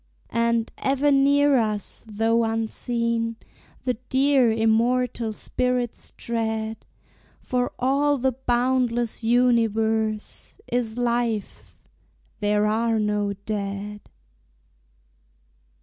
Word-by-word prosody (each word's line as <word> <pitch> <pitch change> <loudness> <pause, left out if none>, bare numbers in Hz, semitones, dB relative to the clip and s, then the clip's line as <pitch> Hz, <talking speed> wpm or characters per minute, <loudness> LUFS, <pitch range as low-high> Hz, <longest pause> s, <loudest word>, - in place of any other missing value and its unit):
And 230 0 +1
ever 275 +2 +2
near 280 0 +4
us, 215 -3 -2
though 225 +2 +1
unseen, 230 +1 -1 0.5
The 255 -1 +1 0.2
dear, 265 -3 +4
immortal 225 +1 +1
spirits 250 +2 -2
tread; 220 -1 -3 0.5
For 250 -1 -1
all 280 +3 +2
the 260 +1 +1
boundless 245 -2 0
universe 225 - +1
Is 240 -2 -2
life 235 -3 -2 0.6
there 210 0 +2
are 225 +1 +1
no 210 -1 0
dead. 205 0 -4
230 Hz, 85 wpm, -24 LUFS, 220-250 Hz, 0.6 s, near